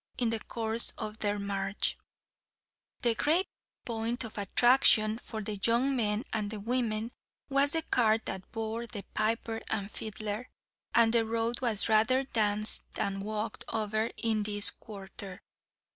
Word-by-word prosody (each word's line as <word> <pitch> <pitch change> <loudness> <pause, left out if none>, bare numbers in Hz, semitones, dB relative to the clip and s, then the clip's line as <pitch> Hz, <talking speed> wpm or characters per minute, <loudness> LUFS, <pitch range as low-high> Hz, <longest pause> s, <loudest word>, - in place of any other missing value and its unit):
In 235 -2 +1
the 225 - -1
course 225 +1 -1
of 215 +1 -5
their 205 0 0
march, 195 0 -1 1.1
the 235 -1 +4
great 320 - +2 0.4
point 230 +1 -2
of 225 - -8
attraction 220 +1 +4
for 220 -3 -6
the 205 0 -4
young 250 +4 +3
men 215 -2 +1
and 210 -2 -1
women 230 -2 0 0.4
was 275 +1 +4
the 325 -1 +1
cart 225 -6 +2
that 190 -1 -5
bore 225 +1 -3
the 210 -4 -7
piper 225 +1 -1
and 205 -1 -2
fiddler, 215 +2 -5 0.5
and 230 -1 +5
the 230 -1 +4
road 230 +2 -1
was 230 -5 0
rather 225 +4 +4
danced 215 -4 +4
than 195 0 -1
walked 215 +2 -4
over 215 0 -1
in 220 -2 0
this 205 0 +1
quarter. 195 -2 -9
220 Hz, 145 wpm, -30 LUFS, 210-235 Hz, 1.1 s, and